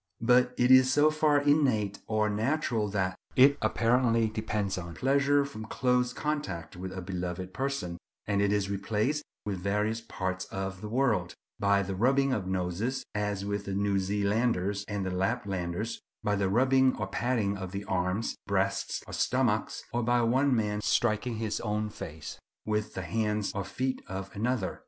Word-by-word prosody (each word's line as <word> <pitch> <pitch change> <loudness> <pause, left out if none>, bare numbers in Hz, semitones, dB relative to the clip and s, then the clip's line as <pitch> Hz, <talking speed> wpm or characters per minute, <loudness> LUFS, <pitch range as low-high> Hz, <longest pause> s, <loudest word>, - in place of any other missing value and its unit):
But 125 +1 +4
it 125 +1 +4
is 130 0 +7
so 150 +2 +5
far 155 -1 +3
innate 130 -9 +2
or 110 -1 +1
natural 110 +1 0
that 95 -2 -1 0.2
it 135 +2 +7
apparently 115 0 +2
depends 105 -2 -2
on 85 -1 -7
pleasure 140 +4 +3
from 110 -6 -7
close 125 +1 +1
contact 120 - -3
with 95 +1 -6
a 95 -1 -6
beloved 90 0 -4
person; 130 -9 -3 0.3
and 100 -1 +1
it 100 0 +2
is 100 -1 +1
replaced 110 +9 -1 0.2
in 100 -2 -1
various 105 +4 -1
parts 95 -4 -3
of 95 -1 -5
the 105 - -5
world, 115 -8 +1 0.2
by 100 -1 +3
the 95 0 -4
rubbing 135 +6 +2
of 100 -6 -2
noses, 95 +8 -1
as 105 -1 -2
with 100 0 -2
the 95 - -3
New 100 0 +1
Zealanders 100 0 0
and 105 -2 -2
Laplanders, 100 -1 -2 0.2
by 105 - +1
the 100 -1 +1
rubbing 130 +4 +4
or 105 - -2
patting 110 -1 0
of 95 -2 -6
the 100 +1 -5
arms, 90 +4 -1
breasts, - - 0
or - - -10
stomachs, - - 0
or 120 - +1
by 120 +1 +2
one 130 +3 +3
man 105 -2 0
striking 115 +2 +1
his 110 -1 -2
own 105 -1 -2
face 80 -5 -8 0.3
with 105 0 -1
the 95 - -3
hands 105 +1 -1
or 100 - -2
feet 130 +6 -2
of 95 0 -6
another. 115 -2 -1
105 Hz, 165 wpm, -29 LUFS, 95-125 Hz, 0.3 s, is